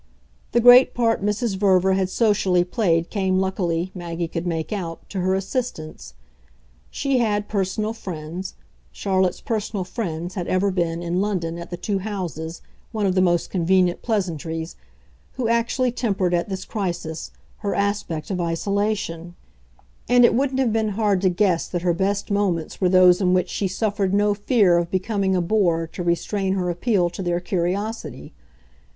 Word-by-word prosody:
The 240 - +4
great 245 +2 +7
part 230 -4 +1
Mrs. 210 0 -1
Verver 190 -1 +3
had 190 -1 0
socially 190 -4 +2
played 175 -3 0
came 190 -3 +1
luckily, 185 -2 -1
Maggie 170 -2 -4
could 165 +2 -4
make 165 +1 -2
out, 170 -5 -5
to 195 - -3
her 185 +1 +1
assistance; 185 - -4 0.7
she 275 -3 0
had 210 -3 0
"personal 210 +2 -1
friends" 180 -3 -6 0.4
Charlotte's 190 -2 0
personal 210 -3 -2
friends 180 -4 -4
had 180 -3 -4
ever 195 +2 +1
been, 170 -2 -1
in 175 +2 0
London, 170 -5 -2
at 170 - -8
the 175 - -5
two 195 +2 -2
houses, 175 -5 -5 0.3
one 215 -3 -1
of 190 - +2
the 185 - +3
most 175 -2 +1
convenient 180 0 +2
pleasantries 165 - -3 0.6
who 250 -3 -2
actually 235 +2 +1
tempered, 200 -7 0
at 175 +3 0
this 190 -1 -4
crisis, 175 -6 -4 0.3
her 200 -2 -2
aspect 200 -5 -2
of 180 -2 -1
isolation; 175 -1 -2 0.7
and 245 0 +6
it - - +4
wouldn't 265 +2 0
have 245 -5 +2
been 220 -1 +1
hard 205 -4 +2
to 190 - +3
guess 180 -2 +1
that 175 -1 -3
her 175 -1 +2
best 200 +4 -1
moments 195 -6 -1
were 185 - +3
those 180 0 +6
in 180 -1 +3
which 180 - +1
she 200 - -1
suffered 200 0 -1
no 205 0 +3
fear 205 -4 +3
of 170 0 -2
becoming 190 0 0
a 180 - +2
bore 170 -4 +1
to 165 - -8
restrain 190 +3 0
her 180 -2 0
appeal 180 0 +1
to 175 +2 -6
their 175 -1 0
curiosity. 185 - -3
190 Hz, 165 wpm, -23 LUFS, 175-210 Hz, 0.7 s, great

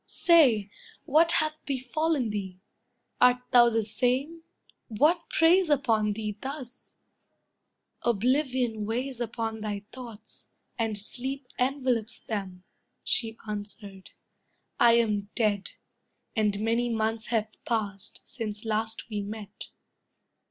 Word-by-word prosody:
Say, 250 - +4 0.3
what 330 +4 +4
hath 310 0 0
befallen 275 -1 0
thee? 190 -3 -5 0.6
Art 250 0 +5
thou 240 -1 +7
the 225 -2 0
same? 255 +9 0 0.5
What 310 +10 +2
preys 340 +2 +4
upon 225 -7 +2
thee 210 -1 -4
thus?" 265 -2 -8 1.1
"Oblivion 245 -1 +1
weighs 245 +2 -3
upon 225 -1 -3
thy 205 -2 -3
thoughts, 235 -4 -11 0.3
and 220 -2 0
sleep 260 +6 -3
Envelops 250 -4 0
them," 190 -4 -5 0.4
she 225 -2 -1
answered; 205 -2 -6 0.7
"I 235 -1 +7
am 210 -3 +1
dead, 205 -4 +1 0.7
And 210 -3 +1
many 230 +2 +1
months 220 0 -1
have 220 -2 0
passed, 205 -4 -3
since 215 -2 -6
last 220 0 -2
we 210 -3 -3
met." 210 0 -7
230 Hz, 110 wpm, -28 LUFS, 210-260 Hz, 1.1 s, thou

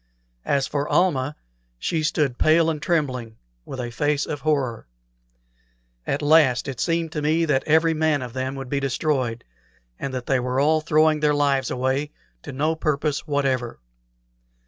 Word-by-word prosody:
As 140 -1 +2
for 145 +1 -3
Almah, 150 -6 +1 0.4
she 160 - -1
stood 150 -4 0
pale 165 +1 +4
and 150 -2 -5
trembling, 130 -10 -1 0.3
with 130 - -7
a 120 -1 -4
face 145 +4 0
of 145 - -5
horror. 135 - -1 1.2
At 140 +2 -1
last 145 -5 +4
it 135 -3 -5
seemed 165 0 0
to 150 - -3
me 160 +3 +2
that 140 -4 +1
every 160 +1 +4
man 155 -3 +1
of 120 -2 -8
them 130 +1 -3
would 135 -1 -6
be 140 +2 -1
destroyed, 135 -3 -1 0.6
and 140 - -4
that 130 -1 -5
they 135 -2 +1
were 125 +1 -1
all 155 +2 +3
throwing 155 0 +3
their 150 -1 +2
lives 140 -3 +1
away 130 +3 -1 0.3
to - - -8
no 150 +4 0
purpose 150 -1 -1
whatever. 135 - -1
145 Hz, 165 wpm, -23 LUFS, 130-155 Hz, 1.2 s, pale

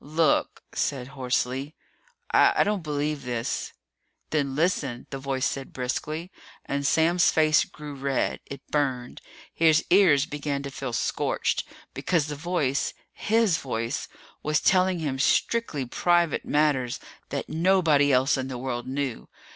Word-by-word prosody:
"Look," 155 +1 +1
said 130 -2 -2
hoarsely, 130 +1 -2 0.6
"I - - +5
don't 205 -2 -1
believe 150 -1 -2
this!" 120 -2 -3 0.6
"Then 140 -3 0
listen," 145 -6 0
the 135 - -4
voice 135 -1 -1
said 135 -1 -3
briskly. 155 +7 -3 0.3
And 140 0 -1
Sam's 170 +3 +4
face 155 -1 +4
grew 150 -1 -9
red. 140 -1 -1
It 140 -1 -9
burned. 130 -4 -1 0.3
His 160 -1 +4
ears 170 -7 +5
began 145 -1 -3
to 140 - -6
feel 130 -2 -5
scorched. - - 0 0.3
Because 165 -5 0
the 150 -1 -5
voice 145 -3 -1 0.2
his 220 -5 +2
voice 115 0 -3 0.3
was 150 0 +1
telling 185 -1 +3
him 145 -5 -3
strictly 155 - +1
private 175 +5 +1
matters 145 -5 +1 0.3
that - - -3
nobody 160 -4 +3
else 130 +2 +3
in 130 0 -3
the 130 -2 -5
world 120 -1 -4
knew. 130 - -3
145 Hz, 135 wpm, -26 LUFS, 130-160 Hz, 0.6 s, I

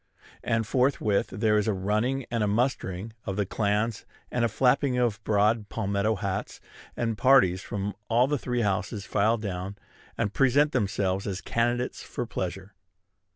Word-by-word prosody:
And 115 0 0
forthwith 125 -4 +1
there 105 +1 +1
is 105 - -1
a 110 - +2
running 110 +8 0
and 115 -2 0
a - - +1
mustering 110 -3 -1
of 95 - -3
the 105 0 0
clans, 105 +2 -1 0.3
and 125 - 0
a - - +4
flapping 130 +3 +2
of 115 -5 0
broad 105 +1 +2
palmetto 100 0 0
hats; 95 -1 -4 0.4
and 115 -3 -1
parties 110 -9 +5
from 100 +1 -4 0.2
all 120 +2 +4
the 145 +1 -1
three 125 0 -1
houses 100 0 -1
file 110 +4 +2
down, 100 -2 -5 0.4
and 105 -3 -1
present 140 +3 +3
themselves 100 -4 0
as 95 -1 -3
candidates 120 +3 -1
for 120 - -5
pleasure. 95 -3 -5
110 Hz, 155 wpm, -27 LUFS, 100-120 Hz, 0.4 s, parties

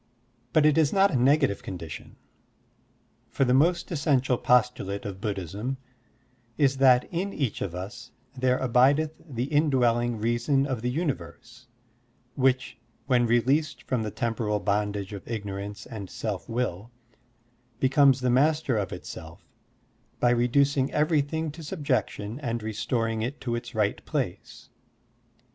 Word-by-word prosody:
But 150 +4 +4
it 155 +1 +4
is 150 -3 +3
not 195 0 +4
a - - -1
negative 135 -2 +3
condition, 85 -5 -8 1.1
for 135 - +1
the 125 - +2
most 170 +8 +2
essen 145 -4 +2
tial 125 -1 -1
postulate 120 -5 +1
of 95 -1 -6
Buddhism 105 +6 -3 0.8
is 135 -2 +3
that 130 -2 +6
in 190 +4 -1
each 135 - -2
of 90 -3 -3
us 110 +7 -7 0.3
there 130 0 +2
abideth 135 +5 +3
the 125 -7 -4
indwelling 125 -5 +2
reason 120 +5 +1
of 130 -5 -3
the 125 - -1
universe, 130 -4 -4 0.7
which, 130 -3 +1 0.3
when 125 -3 +3
released 135 +7 +1
from 125 -3 -1
the 110 - -2
tem 115 +2 -2
poral 105 -2 -2
bondage 105 -1 -1
of 100 - -8
ignorance 105 -1 -5
and 100 -5 -8
self 105 -5 -5
will, 115 -3 -2 0.9
becomes 135 0 +4
the 125 -1 +2
master 145 -2 +2
of 100 - -3
itself - - -9 0.7
by 120 - +3
reducing 130 +3 +2
everything 155 0 0
to 160 +3 -11
subjection 140 - -2
and 120 -5 -3
restoring 115 +1 -1
it 130 +6 -3
to 120 - -2
its 120 -1 -5
right 105 -1 0
place. - - -4
125 Hz, 140 wpm, -27 LUFS, 110-140 Hz, 1.1 s, that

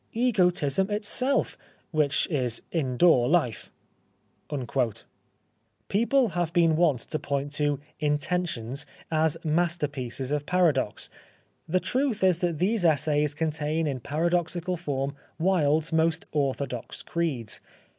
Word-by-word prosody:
Egotism 190 - +2
itself, 215 +6 +1 0.4
which 155 -3 +2
is 125 -6 -1
indoor 130 -3 +3
life." 155 -9 0 2.2
People 235 +4 +3
have 175 -3 -1
been 165 -3 +4
wont 155 -7 +2
to 155 - -3
point 140 0 -2
to 145 -1 +1
" - - -34
Inten 150 +4 0
tions 120 +3 -4
" - - -26 0.2
as 155 - -2
masterpieces 150 -6 -1
of 145 -1 -1
paradox. 160 - +1 0.6
The 185 +3 +2
truth 250 -2 -1
is 185 -3 +4
that 175 -3 0
these 200 +4 +1
essays 150 -2 +2
contain 155 0 -1
in 135 -4 -2
paradoxical 170 +5 -1
form 140 -5 -3 0.2
Wilde's 160 -3 +2
most 160 0 +2
orthodox 135 -4 -2
creeds. 150 -10 -3
160 Hz, 115 wpm, -27 LUFS, 145-180 Hz, 2.2 s, been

